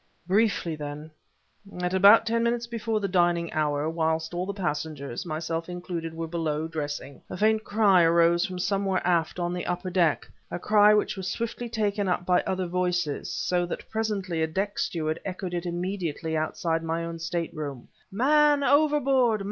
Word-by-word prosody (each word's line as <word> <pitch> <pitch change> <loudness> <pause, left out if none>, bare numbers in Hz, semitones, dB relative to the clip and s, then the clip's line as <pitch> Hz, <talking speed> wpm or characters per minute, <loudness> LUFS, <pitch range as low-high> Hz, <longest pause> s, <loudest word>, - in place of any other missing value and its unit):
Briefly, 185 -4 +1
then, 150 +1 -7 0.7
at 180 0 -1
about 200 +4 +7
ten 230 0 +1
minutes 235 0 0
before 230 -2 -2
the 200 - -1
dining 175 -2 +1
hour, 150 -1 0
whilst 160 0 -1
all 180 +2 -2
the - - -1
passengers, 150 - -4
myself 165 +1 -3
included, 175 -2 -5
were 165 0 -3
below, 160 -2 -2
dressing, 145 -3 -5
a - - -6
faint 220 +2 +2
cry 200 -4 +4
arose 170 +1 +4
from 185 -1 -4
somewhere 195 0 0
aft 170 -2 +1
on 175 0 -1
the 180 - -4
upper 180 +1 -3
deck 170 -4 +2 0.2
a - - -3
cry 210 +3 +5
which 210 0 +2
was 190 -1 -4
swiftly 235 +1 -4
taken 205 -3 -1
up 180 0 -1
by 180 0 +3
other 185 -1 -1
voices, 175 -4 -1
so 175 -1 0
that - - -6
presently 200 -6 -2
a 160 - +2
deck 195 +5 -2
steward 155 -1 -1
echoed 185 -1 -5
it 175 0 -3
immediately 175 -2 -3
outside 165 +1 -1
my 165 +1 -2
own 165 0 -6
stateroom: 160 -5 -4 0.2
"Man 290 +6 +4
overboard! 275 -6 +3
180 Hz, 170 wpm, -26 LUFS, 165-205 Hz, 0.7 s, about